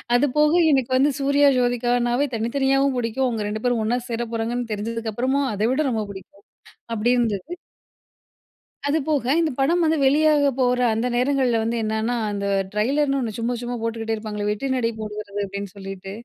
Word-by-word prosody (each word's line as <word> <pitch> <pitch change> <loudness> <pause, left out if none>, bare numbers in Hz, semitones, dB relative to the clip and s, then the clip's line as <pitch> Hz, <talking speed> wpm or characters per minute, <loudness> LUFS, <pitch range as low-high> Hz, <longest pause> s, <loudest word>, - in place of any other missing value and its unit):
அதுபோக 300 +4 +3 0.2
எனக்கு 265 -2 +1
வந்து 280 +3 +3
சூர்யா 280 +1 +4
ஜோதிகானாவே 245 +2 +1
தனித்தனியாவும் 270 +3 +1
புடிக்கும் 245 +2 0
அவங்க 220 -4 -2
2 215 +1 -4
பேரும் 245 -2 +1
ஒண்ணா 245 +3 +1
சேர 235 0 -2
போறாங்கன்னு 230 +1 -2
தெரிஞ்சதுக்கப்புறமும் 230 +5 -1
அத 205 - -5
விட 265 - 0
ரொம்ப 220 -2 -1
புடிக்கும் 195 +1 -13 0.5
அப்டி 225 +3 +1
இருந்தது. 225 - -1 1.3
அது 295 - +2
போக, 290 -5 +1
இந்த 320 -3 +1
படம் 335 +6 +2
வந்து 320 0 +2
வெளியாக 295 +1 +4
போற 250 -1 +2
அந்த 230 +3 -1
நேரங்கள்ல 250 -1 +2
வந்து 230 +1 -1
என்னென்னா, 220 +2 -1 0.2
அந்த 200 0 -3 0.3
ட்ரெய்லர்னு 275 +6 +1
ஒண்ணு 235 -4 -2
சும்ம 235 +2 -1
சும்மா 245 0 -4
போட்டுக்கிட்டே 225 -1 -2
இருப்பாங்க, 215 -1 -5
"வெற்றி 210 +6 -2
நடை 240 -3 +1
போடுகிறது" 210 -1 -6
அப்டின்னு 200 0 -6
சொல்லிட்டு. 195 -1 -8
240 Hz, 160 wpm, -23 LUFS, 220-270 Hz, 1.3 s, சூர்யா